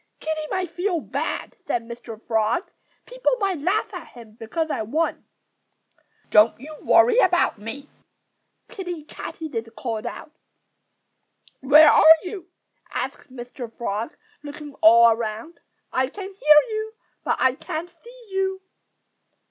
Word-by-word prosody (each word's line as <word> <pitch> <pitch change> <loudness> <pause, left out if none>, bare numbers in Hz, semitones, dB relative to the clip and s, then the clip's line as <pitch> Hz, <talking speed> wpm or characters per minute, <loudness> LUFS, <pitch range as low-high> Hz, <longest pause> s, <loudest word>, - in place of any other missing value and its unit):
"Kiddie 310 -1 -3
might 370 -3 -2
feel 350 +1 -1
bad," - - -4
said 235 - -1
Mr. 235 -1 -9
Frog. 225 - -1 0.3
"People - - 0
might 390 -5 -1
laugh 390 +8 -1
at 345 -4 -7
him 235 -3 -14
because 305 +9 -3
I - - -2
won." 305 +10 -2 1.1
"Don't 210 +2 +5
you 305 +4 -10
worry 480 0 +5
about 355 - +2
me!" 225 +7 -8 0.8
Kiddie 355 -5 -6
Katydid 285 -6 -7
called 225 -4 -4
out. 305 - -8 1.3
"Where 300 +4 +7
are 320 +1 +8
you?" 365 -1 -8 0.4
asked - - -5
Mr. 245 -1 -8
Frog, 230 +4 -4 0.2
looking 295 0 -9
all 230 +1 +7
around. 225 +7 -4 0.3
"I 260 0 +1
can 390 +6 -8
hear 300 -5 +6
you, 435 0 -4 0.3
but - - +1
I 260 -1 +3
can't 335 +4 -6
see 470 +7 -17
you." 385 0 -2
305 Hz, 130 wpm, -23 LUFS, 235-365 Hz, 1.3 s, are